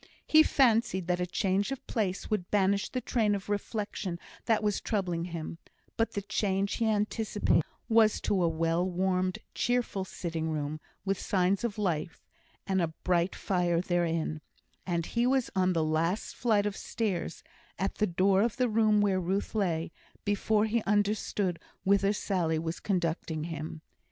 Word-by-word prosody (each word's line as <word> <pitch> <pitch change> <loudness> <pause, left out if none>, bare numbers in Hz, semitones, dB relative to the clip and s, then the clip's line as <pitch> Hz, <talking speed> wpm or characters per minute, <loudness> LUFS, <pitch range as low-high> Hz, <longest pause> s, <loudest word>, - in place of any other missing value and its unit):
He 310 - +7
fancied 230 - +3
that 180 0 0
a 180 - -1
change 195 +4 0
of 270 - -5
place 195 -6 -2
would 205 -5 -2
banish 200 0 +2
the 255 - -3
train 215 -5 +1
of 200 0 -6
reflection 205 -3 -3 0.3
that 220 -2 +2
was 210 -1 +1
troubling 180 -6 -1
him; 165 -1 -6 0.4
but 225 - 0
the 200 - -3
change 200 -1 0
he 230 - +1
anticipated 210 -3 +1 0.3
was 225 -2 +4
to 190 - +1
a 170 - +3
well 165 +1 +1
warmed, 185 0 0 0.2
cheerful 245 -5 0
sitting 165 -3 -4
room, 155 0 -2 0.3
with 195 -1 0
signs 190 +1 +1
of 225 -3 -2
life, 170 -6 -2 0.4
and 190 -1 +1
a 170 - +2 0.2
bright 180 0 +1
fire 175 -3 +1
therein; 165 -3 0 0.5
and 170 -2 0
he 235 +5 +1
was 265 -1 +1
on 185 -1 +3
the 165 -2 +1
last 165 +6 0
flight 215 -4 +2
of 205 -1 -1
stairs, 190 -8 -3 0.3
at 195 - -2
the 210 - +3
door 190 +2 +3
of 235 +1 0
the 250 -2 +2
room 215 -1 +4
where 195 -2 +2
Ruth 190 +3 -1
lay 170 -7 0 0.3
before 210 +1 +2
he 225 +1 +1
understood 205 -3 0 0.2
whither 200 0 +3
Sally 180 -6 0
was 160 +1 -3
conducting 165 -4 -1
him. 160 -1 -6
190 Hz, 160 wpm, -30 LUFS, 170-210 Hz, 0.5 s, He